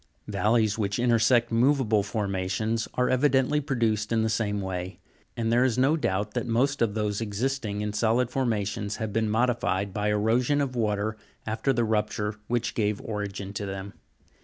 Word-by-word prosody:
Valleys 110 +1 +1
which 100 -2 0
intersect 120 0 +3
moveable 115 -3 +3
formations 100 +2 -2
are 125 0 +2
evidently 135 +2 +2
produced 115 -6 0
in 115 -1 +2
the 110 - +1
same 105 -2 0
way; 95 -1 -4 0.4
and 115 -1 0
there 120 +1 +4
is 125 -2 +1
no 135 +5 +4
doubt 105 -8 -1
that - - -2
most 135 +4 +1
of 110 -3 +1
those 105 -1 -1
existing 110 0 -2
in 105 0 -2
solid 115 +3 +1
forma 120 -6 0
tions, 105 +1 -3
have 110 -3 -4
been 110 0 +1
modified 110 -4 0
by 105 +1 0
erosion 115 +7 +2
of 135 -3 -1
water 110 -1 -1 0.3
after 110 +5 0
the 120 -2 +1
rupture 105 -1 -1
which 120 -1 -1
gave 105 -2 0
origin 100 -5 -5
to 100 0 -4
them. 95 +1 -6
110 Hz, 170 wpm, -27 LUFS, 105-120 Hz, 0.4 s, there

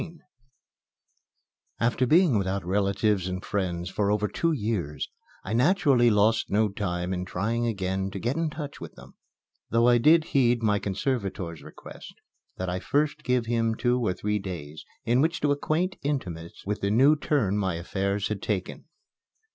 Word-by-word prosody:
XIV 170 -1 -8 1.6
After 120 +2 +1
being 160 - +4
without 95 -1 -2
relatives 100 0 +1
and 90 +1 -4
friends 90 -4 -2
for 100 -1 0
over 105 0 +1
two 165 +10 0
years 105 - -2 0.4
I 105 - -4
naturally 130 -2 +4
lost 110 +1 +2
no 105 +1 +2
time 90 -3 -3
in 90 0 -2
trying 110 +6 -1
again 95 -3 -2
to 100 - -7
get 120 +7 -1
in 165 -1 0
touch 150 -2 -7
with - - -9
them; - - -14 0.6
though 115 +1 +3
I 120 -1 +5
did 155 +6 +5
heed 120 -3 +3
my 105 -2 +2
conservator's 100 - -3
request - - -12 0.4
that 95 - -3
I 90 +1 -2
first 145 +7 0
give 125 -2 +1
him 115 -1 0
two 125 +1 +1
or 105 - +1
three 105 +2 -1
days 80 -6 -7 0.2
in 120 +3 +3
which 165 +4 +1
to 145 - +2
acquaint 160 +6 -1
intimates 90 - -4
with 105 +1 -3
the 100 - 0
new 135 +8 +5
turn 140 -9 0
my 95 -4 0
affairs 100 +4 -2
had 105 -2 -3
taken. 95 -4 -3
105 Hz, 165 wpm, -26 LUFS, 95-125 Hz, 1.6 s, I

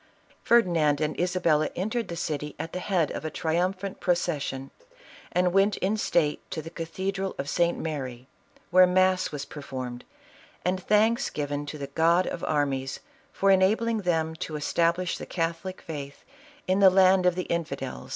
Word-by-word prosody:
Ferdinand 170 -11 +3
and 155 0 -2
Isabella 170 -4 +2
entered 220 +5 -2
the 170 - -5
city 150 -3 -3
at 160 +2 -6
the 180 - -3
head 180 -5 0
of - - -5
a 155 - -2
triumphant 185 +5 -1
procession, 150 -7 -1 0.6
and 180 0 +2
went 195 +1 +3
in 195 +4 0
state 160 -8 +1
to - - -4
the 165 - -9
cathedral 190 +4 -3
of 140 - -4
St. 170 +3 +1
Mary, 130 -6 -5 0.4
where 185 +1 +7
mass 185 0 +2
was 145 -2 -5
performed, 130 -4 -7 0.6
and 185 +1 0
thanks 220 +6 +2
given 145 0 -3
to 150 - -6
the 140 - -4
God 165 +6 +2
of - - -5
armies 135 -3 -1 0.3
for 195 0 +2
enabling 215 +4 +3
them 165 -4 0
to 155 - -5
establish 170 +4 0
the - - -7
catholic 170 +2 -3
faith 140 -3 -7 0.4
in 185 +1 +1
the 195 -1 +8
land 185 0 +5
of 180 - +3
the 180 - -2
infidels. 140 -6 -4
170 Hz, 160 wpm, -27 LUFS, 150-185 Hz, 0.6 s, the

